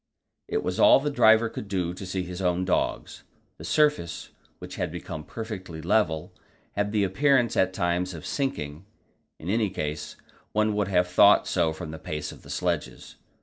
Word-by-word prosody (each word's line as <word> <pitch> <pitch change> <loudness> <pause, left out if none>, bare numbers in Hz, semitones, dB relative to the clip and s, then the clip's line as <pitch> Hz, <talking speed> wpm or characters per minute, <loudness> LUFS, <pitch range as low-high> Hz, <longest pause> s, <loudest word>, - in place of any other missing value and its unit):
It - - -1
was - - -2
all - - +7
the 145 +1 -2
driver 110 -4 +5
could 105 - -7
do 90 -3 -1
to 95 +1 -8
see 95 0 -2
his 90 +1 -6
own 90 0 +1
dogs. 90 - -1 0.4
The - - -9
surface, 150 - +1 0.3
which - - -9
had - - -2
become 80 -2 -6
perfectly 95 -5 -7
level, 80 -2 0 0.4
had 105 0 -1
the 105 -1 +2
appearance 120 +4 +2
at 95 0 +3
times 90 -1 -1
of 80 - -9
sinking; 95 - -3 0.5
in 80 - -10
any 105 +1 +1
case, 75 -3 -4 0.4
one 110 0 +2
would 105 -2 0
have 90 -2 +2
thought 100 +3 +5
so 80 - +1
from 80 0 -7
the 80 - -8
pace 75 -1 -5
of - - -13
the - - -15
sledges. - - -3
95 Hz, 180 wpm, -26 LUFS, 85-110 Hz, 0.5 s, all